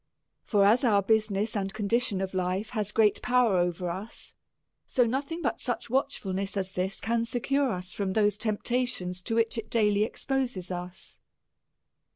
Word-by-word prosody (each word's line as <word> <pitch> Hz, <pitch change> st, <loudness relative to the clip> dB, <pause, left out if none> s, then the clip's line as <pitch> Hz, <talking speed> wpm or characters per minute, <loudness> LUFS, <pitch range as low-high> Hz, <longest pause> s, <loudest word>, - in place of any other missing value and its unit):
For 205 Hz, -3 st, +3 dB
as 225 Hz, +6 st, +5 dB
our 205 Hz, -5 st, +4 dB
business 215 Hz, 0 st, +1 dB
and 195 Hz, -1 st, -2 dB
condition 215 Hz, -1 st, 0 dB
of 190 Hz, 0 st, -3 dB
life 185 Hz, +4 st, -1 dB
has 210 Hz, -4 st, -1 dB
great 215 Hz, -2 st, +3 dB
power 245 Hz, -6 st, +3 dB
over 175 Hz, +1 st, 0 dB
us, 195 Hz, +5 st, -8 dB, 0.5 s
so 245 Hz, -, +3 dB
no 255 Hz, +4 st, 0 dB
thing 330 Hz, +4 st, -6 dB
but -, -, 0 dB
such -, -, -3 dB
watchfulness 200 Hz, -8 st, -1 dB
as 190 Hz, -1 st, -2 dB
this, 190 Hz, +1 st, -2 dB
can 230 Hz, +1 st, 0 dB
secure 260 Hz, +3 st, 0 dB
us 180 Hz, -2 st, -5 dB
from 195 Hz, -2 st, -2 dB
those 210 Hz, -1 st, +3 dB
temptations 215 Hz, -4 st, -1 dB
to 225 Hz, -, -3 dB
which 230 Hz, 0 st, +1 dB
it 220 Hz, -, -8 dB
daily 210 Hz, -2 st, +3 dB
exposes 245 Hz, -6 st, -2 dB
us. 180 Hz, 0 st, -5 dB
210 Hz, 165 wpm, -28 LUFS, 190-235 Hz, 0.5 s, as